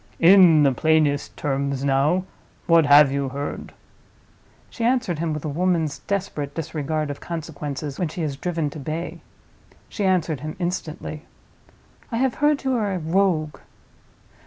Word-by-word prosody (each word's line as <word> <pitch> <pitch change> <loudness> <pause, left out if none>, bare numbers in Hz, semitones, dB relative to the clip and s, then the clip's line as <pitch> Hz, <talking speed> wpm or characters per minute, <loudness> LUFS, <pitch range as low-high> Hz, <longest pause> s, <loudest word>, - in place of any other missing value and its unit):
In 170 -3 +7
the 140 - +4
plainest 155 0 +1
terms, 140 -1 -2
now, 140 +6 +2 0.4
what 165 -3 +4
have 145 -1 +7
you 140 -1 -1
heard?" 140 +2 -5 1.0
She 235 - -5
answered 235 -9 +1
him 165 -1 -1
with 150 -1 -4
a - - -1
woman's 165 -1 0
desperate 180 -8 -3
disregard 155 -1 -3
of 145 - -8
consequences 150 -3 -6
when 180 - 0
she 160 +2 -5
is 145 -3 -2
driven 160 0 -2
to 155 - -8
bay—she 160 - -8
answered 175 -6 +1
him 155 +2 -6
instantly, 165 -3 -5 0.8
"I 230 - -1
have 260 0 +1
heard 295 -1 +2
you 265 -1 0
are 210 -5 0
a - - -1
Rogue." 165 -2 0
155 Hz, 145 wpm, -23 LUFS, 145-180 Hz, 1.0 s, In